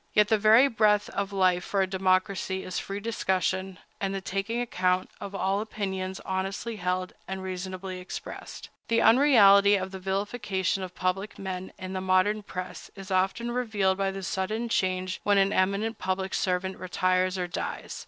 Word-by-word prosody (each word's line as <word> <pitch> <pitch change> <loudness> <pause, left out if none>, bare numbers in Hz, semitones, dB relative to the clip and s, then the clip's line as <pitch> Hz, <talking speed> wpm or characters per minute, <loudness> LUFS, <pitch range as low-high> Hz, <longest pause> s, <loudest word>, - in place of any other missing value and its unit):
Yet 210 0 +4
the 220 - +4
very 220 +6 +7
breath 210 -4 +2
of 200 0 -2
life 185 -2 +2
for 195 -1 +1
a - - +2
democracy 190 0 0
is 185 - -3
free 195 +1 -5
discussion, 190 -3 -1 0.2
and 195 0 -2
the - - -1
taking 195 +5 -2
account, 185 -6 0
of 200 -1 -6
all 195 +1 0
opinions 190 -3 -4
honestly 195 +4 -3
held 180 0 -2
and 190 0 -5
reasonably 185 0 -5
expressed. 180 - -8 0.2
The 230 0 +2
unreality 205 -6 +7
of 190 -1 -2
the 190 - -7
vilification 195 0 -1
of 185 -1 -6
public 190 +3 -2
men 185 -1 -5
in 185 0 -6
the 185 - -2
modern 185 +3 +2
press 185 -2 -7
is 195 -1 -9
often 195 +6 +1
revealed 210 -6 0
by 195 0 +1
the 195 0 -6
sudden 215 +6 -2
change 185 -3 -1
when 205 -1 +3
an 195 +1 +3
eminent 200 +4 0
public 190 0 -2
servant 185 0 -1
retires 185 0 +1
or 180 - -1
dies. 175 - -5
190 Hz, 170 wpm, -27 LUFS, 185-205 Hz, 0.2 s, very